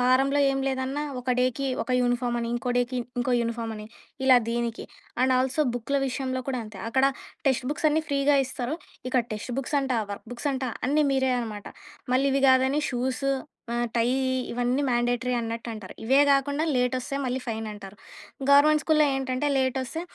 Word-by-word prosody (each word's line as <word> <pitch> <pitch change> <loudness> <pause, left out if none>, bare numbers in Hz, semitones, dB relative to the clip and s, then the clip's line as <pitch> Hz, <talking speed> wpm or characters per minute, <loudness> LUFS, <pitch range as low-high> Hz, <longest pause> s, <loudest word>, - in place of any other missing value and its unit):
వారంలో 270 +3 +3
ఏం 270 0 -1
లేదన్నా 265 +3 -2 0.2
ఒక 250 -1 +1
డేకి 255 +2 0 0.2
ఒక 255 - -7
యూనిఫామని, 240 -1 0
ఇంకో 245 +1 -2
డేకి 245 +1 -1 0.2
ఇంకో 245 0 +1
యూనిఫామని, 225 -2 -4 0.4
ఇలా 255 -2 +8
దీనికి 235 -1 -2 0.4
అండ్ 260 0 +4
ఆల్సో 265 +4 0
బుక్కుల 275 +4 -1
విషయంలో 260 0 -3
కూడా 255 -2 -1
అంతే 210 -2 -11
అక్కడ 265 +2 +3 0.4
టెక్స్ట్ 255 -1 0
బుక్స్ 305 +1 0
అన్నీ 315 +1 +1
ఫ్రీగా 280 +1 +3
ఇస్తారు. 255 +2 -3 0.3
ఇక్కడ 255 -2 +2
టెక్స్ట్ 230 +3 -5
బుక్స్ 280 +2 -1
అంట, 265 -1 -2 0.2
వర్క్ 200 - -9
బుక్స్ 245 +4 -3
అంటా 260 -1 -2 0.2
అన్నీ 300 +2 +3
మీరే 265 -1 +2
అనమాట. 210 -3 -6 0.5
మళ్ళీ 270 +2 +3
ఇవి 275 - +2
కాదని 265 +3 +3
షూసు, 255 +2 -1 0.4
ఆహ్, 240 0 0
టైయ్యీ 255 +3 +2 0.2
ఇవన్నీ 245 +3 0
మ్యాండేటరీ 245 +1 +1
అన్నట్టంటారు. 230 -3 -6
ఇవే 270 +4 +5
గాకుండా 285 +2 +2
లేటొస్తే 250 +2 0
మళ్ళీ 255 +1 -1
ఫైనంటారు. 210 -3 -6 0.5
గవర్నమెంట్ 300 +2 +6
స్కూల్‌లో 305 -2 +4
ఏంటంటే 265 +2 -1
లేటొస్తే 260 +4 -1
255 Hz, 160 wpm, -26 LUFS, 240-275 Hz, 0.5 s, ఇలా